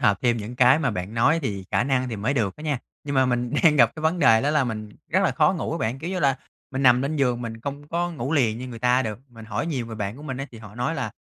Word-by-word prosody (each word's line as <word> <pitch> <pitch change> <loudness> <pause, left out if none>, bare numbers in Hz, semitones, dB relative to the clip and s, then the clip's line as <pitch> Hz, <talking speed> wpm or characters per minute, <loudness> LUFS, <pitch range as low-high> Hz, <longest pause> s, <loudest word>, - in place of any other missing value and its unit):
hợp 105 -5 +3
thêm 120 -1 +3
những 115 +3 -6
cái 125 +3 +6
mà 160 - 0
bạn 90 +4 -5
nói 140 +8 +3
thì 100 -7 -3
khả - - +2
năng 130 -2 0
thì 115 - -4
mới 110 +8 -1
được 105 -7 0
đó 150 - -11
nha. 150 -4 -1 0.3
Nhưng 140 -1 -3
mà 130 -1 +4
mình 125 -1 0
đang 155 -2 +5
gặp 115 -4 +6
cái - - -6
vấn 160 +3 +1
đề 115 -8 +5
đó 145 - +1
là 150 -3 +2
mình 110 -3 -4 0.2
rất - - +3
là - - +3
khó - - +3
ngủ - - -3
á - - -2
bạn, 115 +5 -2
kiểu 170 +5 -5
như 185 - -2
là, 135 -3 +3 0.3
mình 135 0 -2
nằm 125 -1 +5
lên 145 +3 -2
giường 125 -4 +1
mình 115 -1 -6
không 145 +3 -6
có 175 +2 -1
ngủ 140 -1 -3
liền 115 -7 +2
như 130 +1 -6
người 120 -2 -8
ta 125 +2 +3
được. 110 -3 -4
Mình 115 -2 -12
hỏi 110 +8 -3
nhiều 130 -8 -2
người 115 -1 -7
bạn 105 +1 -4
của 145 - -11
mình 135 -4 -5
á 135 +1 -4
thì 115 - -10
họ 105 -1 -12
nói 125 +7 -1
là - - -3
125 Hz, 320 wpm, -24 LUFS, 115-145 Hz, 0.3 s, cái